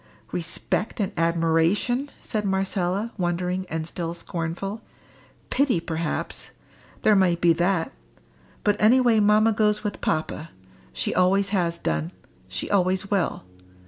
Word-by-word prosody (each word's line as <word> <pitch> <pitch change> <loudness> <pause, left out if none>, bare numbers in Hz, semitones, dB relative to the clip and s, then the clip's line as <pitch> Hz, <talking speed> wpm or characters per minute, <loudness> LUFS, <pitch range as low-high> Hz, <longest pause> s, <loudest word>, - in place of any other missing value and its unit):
"Respect 175 +6 -2
and 200 - 0
admiration!" 170 - +1
said 215 -2 -2
Marcella, 195 +2 -1
wondering, 180 +1 -1
and 160 -1 -3
still 170 0 -4
scornful. 175 +5 -4 0.7
"Pity, 260 -8 +2
perhaps. 165 -1 -3 0.5
There 215 - +5
might 180 -3 +3
be 170 -1 +5
that. 175 0 0 0.7
But 205 -1 +2
any 230 +5 +6
way 240 -3 +4
mamma 215 +2 +4
goes 210 0 +2
with 210 -2 -4
papa. 155 0 -2 0.4
She 65 - -2
always 195 +2 +3
has 175 -4 0
done. 80 - -2 0.3
She 90 -1 -4
always 190 0 +1
will. 195 - 0
185 Hz, 125 wpm, -25 LUFS, 165-210 Hz, 0.7 s, any